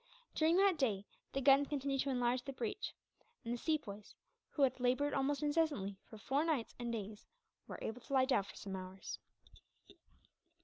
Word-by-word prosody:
During 320 +2 +4
that 385 -4 +4
day 205 -7 +1 0.3
the 275 - -1
guns 275 +1 +6
continued 275 -2 0
to 280 - -1
enlarge 245 -1 +1
the 275 - -5
breach; 255 - -3 0.5
and 230 - -1
the - - -1
Sepoys, 220 -11 -2 0.3
who 285 - +1
had 260 -1 +3
laboured 255 +4 +2
almost 280 +2 +1
incessantly 290 - +1
for 220 - -9
four 270 +7 +1
nights 305 -8 0
and 240 -1 -2
days, 210 -2 -5 0.4
were - - -6
able 225 +3 -4
to 275 - -8
lie 260 -1 +5
down 260 -7 +3
for - - -11
some 195 -1 -5
hours. 185 0 -6
260 Hz, 175 wpm, -37 LUFS, 220-290 Hz, 0.5 s, guns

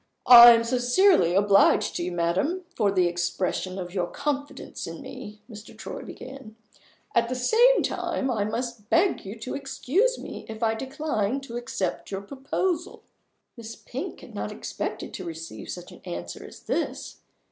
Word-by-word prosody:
"I 240 -1 +11
am 230 0 +2
sincerely 245 - +3
obliged 200 0 +4
to - - -2
you, 180 - -3
madam, 185 - -1
for 205 -2 +2
the 185 -2 +3
expression 175 +2 -2
of 180 -1 -6
your 180 -3 -1
confidence 285 +7 -4
in - - -7
me," 215 -5 -10
Mr. 220 -2 -12
Troy - - -7
began; 260 -4 -10 0.6
"at 235 - +2
the 255 - -2
same 460 - +4
time, 265 -1 -2
I 215 -4 0
must 235 -1 -4
beg 365 +3 +2
you 200 +4 -8
to 255 - -5
excuse 305 - 0
me - - -9
if 220 +1 -6
I 220 -1 +2
decline 265 -2 -2
to 240 -4 -9
accept 220 -6 -3
your 195 -1 -4
proposal." 305 - -3 0.5
Miss 230 -1 -9
Pink - - -7
had - - -13
not - - -4
expected - - -5
to 185 - -6
receive 165 - -8
such - - -7
an - - -14
answer 85 0 -6
as - - -12
this. - - -3
230 Hz, 165 wpm, -26 LUFS, 195-270 Hz, 0.6 s, I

